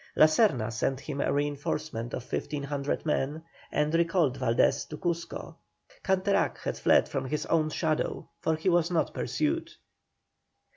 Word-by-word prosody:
La -, -, +8 dB
Serna 155 Hz, -, +2 dB
sent 130 Hz, +5 st, 0 dB
him 145 Hz, -3 st, -4 dB
a -, -, +1 dB
reinforcement 145 Hz, -4 st, -2 dB
of 125 Hz, -, -5 dB
1,500 145 Hz, 0 st, -3 dB
men, 150 Hz, +1 st, -1 dB, 0.3 s
and 150 Hz, +1 st, +1 dB
recalled 165 Hz, -5 st, +2 dB
Valdés 120 Hz, -2 st, +2 dB
to 150 Hz, -, -6 dB
Cuzco. 170 Hz, 0 st, -3 dB, 0.5 s
Canterac 190 Hz, +1 st, +1 dB
had -, -, -3 dB
fled -, -, +4 dB
from 130 Hz, -, -3 dB
his 150 Hz, +3 st, -2 dB
own 155 Hz, -2 st, +2 dB
shadow, 155 Hz, 0 st, -1 dB
for 160 Hz, -, +1 dB
he 160 Hz, +4 st, -4 dB
was 175 Hz, -2 st, +3 dB
not 170 Hz, -3 st, 0 dB
pursued. 320 Hz, +2 st, -1 dB
155 Hz, 145 wpm, -29 LUFS, 140-170 Hz, 0.5 s, La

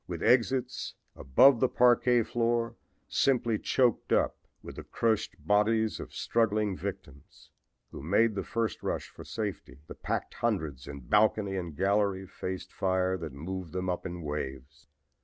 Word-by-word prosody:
With 85 Hz, -2 st, -5 dB
exits 125 Hz, +1 st, +1 dB, 0.2 s
above 120 Hz, -, +5 dB
the 130 Hz, -, +3 dB
parquet 120 Hz, -1 st, +4 dB
floor 115 Hz, 0 st, 0 dB, 0.3 s
simply 120 Hz, -5 st, +1 dB
choked 125 Hz, -3 st, +1 dB
up -, -, +2 dB, 0.3 s
with -, -, -10 dB
the -, -, -6 dB
crushed 110 Hz, -2 st, -1 dB
bodies 110 Hz, +1 st, +2 dB
of -, -, -8 dB
struggling 105 Hz, -3 st, 0 dB
victims, 90 Hz, -8 st, -9 dB, 0.4 s
who -, -, -8 dB
made 105 Hz, +9 st, +2 dB
the 100 Hz, -, -3 dB
first 115 Hz, -1 st, -2 dB
rush -, -, -3 dB
for -, -, -12 dB
safety, 100 Hz, -10 st, -5 dB
the -, -, -9 dB
packed -, -, -3 dB
hundreds 70 Hz, -5 st, -2 dB
in 70 Hz, -1 st, -7 dB
balcony 105 Hz, -, +2 dB
and 85 Hz, -5 st, -4 dB
gallery 100 Hz, -1 st, +1 dB
faced 95 Hz, 0 st, -6 dB
fire 95 Hz, -1 st, +1 dB
that 80 Hz, -4 st, -6 dB
moved 85 Hz, +4 st, -6 dB
them 90 Hz, 0 st, -1 dB
up 90 Hz, -, -4 dB
in 90 Hz, -1 st, -7 dB
waves. 70 Hz, -1 st, -6 dB
100 Hz, 150 wpm, -29 LUFS, 85-115 Hz, 0.4 s, above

